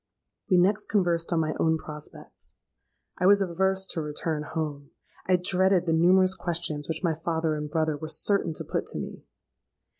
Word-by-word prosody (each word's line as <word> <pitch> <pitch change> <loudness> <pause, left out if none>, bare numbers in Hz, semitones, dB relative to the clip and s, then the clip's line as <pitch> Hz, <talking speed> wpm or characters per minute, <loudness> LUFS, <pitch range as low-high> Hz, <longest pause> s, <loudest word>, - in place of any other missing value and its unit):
We 185 - +5
next 195 +4 +2
conversed 175 -5 +1
on 165 -1 +2
my 155 -1 -1
own 160 0 +3
prospects. 150 -1 -10 0.6
I 180 - +3
was 200 +1 +6
averse 190 +1 0
to 170 -3 -3
return 150 +1 -2
home: 145 -3 -3 0.4
I 185 - +5
dreaded 180 0 +2
the 165 - +1
numerous 185 +3 +4
questions 165 -5 -3
which 160 +3 -3
my 170 -2 +2
father 160 0 -1
and 150 0 -4
brother 155 -1 0
were 155 +2 -7
certain 170 +1 +1
to - - -4
put - - -3
to - - -4
me. - - -7
165 Hz, 175 wpm, -27 LUFS, 155-185 Hz, 0.6 s, was